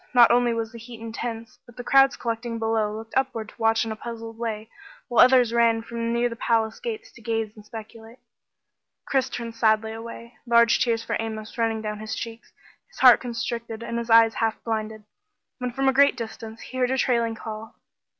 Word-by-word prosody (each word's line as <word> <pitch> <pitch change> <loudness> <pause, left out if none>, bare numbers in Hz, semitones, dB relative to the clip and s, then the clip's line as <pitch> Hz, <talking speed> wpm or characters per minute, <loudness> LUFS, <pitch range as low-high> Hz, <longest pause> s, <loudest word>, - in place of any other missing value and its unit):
Not 240 -1 +8
only 240 0 +3
was 225 -1 -3
the 235 - -10
heat 230 0 -11
intense 225 0 -6
but 240 - -17
the 245 - -6
crowds 270 +1 +5
collecting 230 0 -3
below 225 -1 0
looked 220 +1 -8
upward 255 -5 -1
to - - -18
watch 225 0 +3
in 225 - -4
a - - -3
puzzled 225 0 -7
way, 220 -2 -4 0.4
while 240 - +6
others 250 -2 +5
ran 230 -1 +3
from 230 0 -3
near 235 +1 +2
the 230 - -6
palace 225 -1 0
gates 450 -4 -6
to 235 - -16
gaze 225 -1 -2
and 210 - -13
speculate. 225 +2 -11 0.9
Chris 265 -1 +1
turned 235 -2 -5
sadly 220 -1 +2
away, 230 +1 -9
large 235 0 +5
tears 230 -2 0
for - - -2
Amos 220 -1 -5
running 225 -2 -1
down 210 -1 -4
his 215 0 -5
cheeks, 230 0 -7 0.4
his - - -19
heart 250 -2 +8
constricted 235 -2 -4
and 235 0 -3
his 235 0 -6
eyes 225 0 +6
half 225 -1 0
blinded, 220 -1 -3 0.6
when 250 0 -2
from 270 +2 -1
a 265 - +4
great 280 +2 +5
distance, 225 -1 -7
he 255 - -7
heard 250 -1 +2
a 265 - 0
trailing 235 -3 +1
call. 220 0 -8
230 Hz, 200 wpm, -25 LUFS, 225-240 Hz, 0.9 s, Not